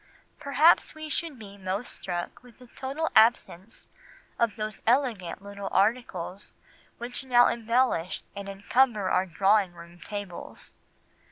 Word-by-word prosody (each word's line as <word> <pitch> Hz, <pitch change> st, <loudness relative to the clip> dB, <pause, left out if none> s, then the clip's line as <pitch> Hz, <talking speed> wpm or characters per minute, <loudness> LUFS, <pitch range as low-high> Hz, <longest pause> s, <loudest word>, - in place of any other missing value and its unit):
"Perhaps 300 Hz, +4 st, +4 dB
we 310 Hz, 0 st, -7 dB
should 315 Hz, -3 st, -3 dB
be 200 Hz, -2 st, -12 dB
most 195 Hz, +5 st, -3 dB
struck 175 Hz, +6 st, -5 dB
with 245 Hz, -2 st, -18 dB
the 250 Hz, -, -15 dB
total 280 Hz, +5 st, -3 dB
absence 220 Hz, -3 st, +2 dB, 0.5 s
of 230 Hz, -3 st, +1 dB
those 215 Hz, -1 st, -5 dB
elegant 230 Hz, -9 st, +1 dB
little 200 Hz, -1 st, -6 dB
articles 200 Hz, -4 st, -1 dB, 0.4 s
which 245 Hz, +3 st, -5 dB
now 245 Hz, -2 st, +5 dB
embellish 230 Hz, -6 st, 0 dB
and 200 Hz, 0 st, -6 dB
encumber 205 Hz, +1 st, +1 dB
our 185 Hz, +1 st, +2 dB
drawing 195 Hz, +1 st, +2 dB
room 170 Hz, 0 st, -13 dB
tables. 205 Hz, -2 st, -8 dB
215 Hz, 125 wpm, -27 LUFS, 195-250 Hz, 0.5 s, now